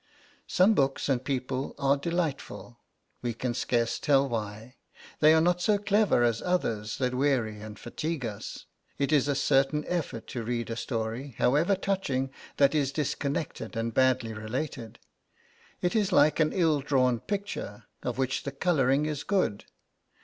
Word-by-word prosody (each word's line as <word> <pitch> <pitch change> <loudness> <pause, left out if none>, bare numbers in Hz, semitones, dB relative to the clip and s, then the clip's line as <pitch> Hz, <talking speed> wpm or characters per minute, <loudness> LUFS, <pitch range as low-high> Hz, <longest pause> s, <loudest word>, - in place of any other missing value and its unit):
Some 190 +5 +4
books 135 -6 +1
and 130 -2 +1
people 130 0 -3
are 140 0 +3
delightful, 145 -6 -3 0.4
we 120 -2 -2
can 120 +1 -2
scarce 115 -1 0
tell 140 -1 +3
why; 110 +1 -5 0.4
they 155 0 +7
are 160 - +6
not 175 +2 +2
so 210 +2 +3
clever 205 - +2
as 115 -2 +1
others 115 -12 -1
that 125 -1 0
weary 125 -5 +1
and 105 -1 -8
fatigue 150 +3 -4
us. 105 -3 -6 0.3
It 140 +2 0
is 145 -2 +3
a 145 - +1
certain 140 +2 +2
effort 155 -10 -3
to 120 - -4
read 115 0 -2
a - - -2
story, 115 +2 -4
however 155 +10 +3
touching, 165 -10 -1 0.3
that 140 -1 +4
is 140 -3 +1
disconnected 140 -4 -3
and 115 0 -2
badly 130 -3 +2
related. 115 +1 -5 0.8
It 180 +1 0
is 210 -3 +2
like 150 -2 +4
an 155 -1 +3
ill 165 -5 +2
drawn 130 -4 +2
picture, 200 - -5 0.2
of 125 -1 -3
which 130 0 0
the 140 - -5
colouring 140 -2 +2
is 150 -2 -3
good. 185 - 0
135 Hz, 155 wpm, -28 LUFS, 120-155 Hz, 0.8 s, they